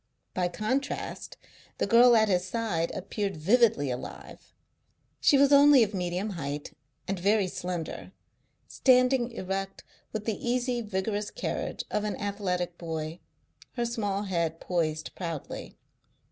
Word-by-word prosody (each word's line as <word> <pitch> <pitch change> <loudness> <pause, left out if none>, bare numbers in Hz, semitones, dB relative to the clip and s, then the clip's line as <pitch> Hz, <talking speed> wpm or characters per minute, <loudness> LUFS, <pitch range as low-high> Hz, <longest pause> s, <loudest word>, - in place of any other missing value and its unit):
By 180 -1 +1
contrast 255 +10 -3 0.4
the - - +1
girl 240 +1 +7
at 220 -1 +5
his 180 -3 +2
side 185 -4 -1
appeared 195 -1 -3
vividly 185 - +3
alive. 125 - -8 0.7
She 280 - +5
was 280 +1 +5
only 280 -2 +8
of 210 -1 -2
medium 180 +2 -2
height 145 -4 -5 0.3
and 195 -1 -2
very 200 +2 +3
slender, 180 -3 -5 0.6
standing 255 -1 +3
erect 195 -3 -4 0.3
with 215 -1 -4
the 220 -3 -3
easy, 245 0 0
vigorous 205 0 -2
carriage - - -3
of 210 - 0
an 210 - -2
athletic 180 -4 -2
boy, 160 0 -4 0.5
her 240 -2 -1
small 205 -4 -1
head 170 -4 -1
poised 155 -3 -2
proudly. 165 -5 -6
200 Hz, 130 wpm, -28 LUFS, 175-230 Hz, 0.7 s, only